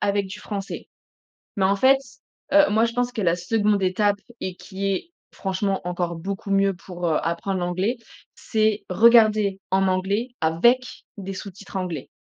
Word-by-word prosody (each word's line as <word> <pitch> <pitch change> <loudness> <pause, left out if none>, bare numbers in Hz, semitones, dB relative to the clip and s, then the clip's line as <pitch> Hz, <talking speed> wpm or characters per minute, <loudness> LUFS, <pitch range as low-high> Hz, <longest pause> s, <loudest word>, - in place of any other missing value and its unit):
avec 200 -1 +1
du 200 +2 -9
français. 200 -2 -6 0.7
Mais 190 - +3
en 195 +1 +3
fait, 265 +6 +5 0.5
heu, 300 0 +6
moi, 220 +2 +3
je 230 - -3
pense 245 0 0
que 225 - -4
la 170 -3 +2
2de 205 +2 +1
étape 200 +2 +1 0.2
et 185 -1 -4
qui 195 +1 -6
est 195 - -2 0.2
franchement 195 0 -2
encore 175 -1 -2
beaucoup 195 +4 -5
mieux 195 -1 +3
pour, 175 -1 -5
heu, 160 - +2
apprendre 170 +3 -2
l'anglais, 185 +7 -1 0.4
c'est 215 -1 0
regarder 215 -1 +5
en 190 0 +2
anglais, 195 +6 0
avec 235 +11 +3 0.3
des 195 -1 -5
sous-titres 195 +1 -10
anglais. 180 -7 -3
195 Hz, 160 wpm, -23 LUFS, 185-215 Hz, 0.7 s, heu